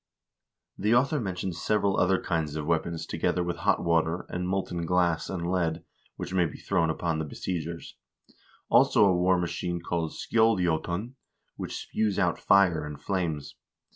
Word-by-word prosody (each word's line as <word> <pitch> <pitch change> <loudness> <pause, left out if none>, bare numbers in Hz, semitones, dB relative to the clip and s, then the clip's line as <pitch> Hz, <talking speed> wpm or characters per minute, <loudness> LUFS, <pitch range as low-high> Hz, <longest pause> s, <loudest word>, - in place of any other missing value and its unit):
2 - - -11
The 105 +4 +3
author 140 +4 +2
mentions 90 -5 -4
several 100 -2 +1
other 95 +1 +3
kinds 80 -4 -2
of 75 -1 -3
weapons 85 +1 -1
together 90 - 0
with 85 -1 -3
hot 85 - +1
water, 85 0 +1
and 90 0 -3
molten 90 -2 -2
glass 85 -2 +1
and 85 -3 -3
lead, 85 -2 0 0.3
which 90 - -6
may 90 -2 +3
be - - -9
thrown 90 -4 0
upon 80 0 -1
the - - -1
besiegers; 85 +2 -5 0.7
also 105 - +5
a 95 -2 +4
war 90 +1 +3
machine 85 0 -2
called 85 -1 -2
skjoldJQtun, 95 -1 +1 0.4
which - - -5
spews 105 -3 -1
out 90 -4 +1
fire 90 -5 +4
and 75 -1 -7
flames. 80 -4 -2
90 Hz, 160 wpm, -27 LUFS, 85-95 Hz, 0.7 s, also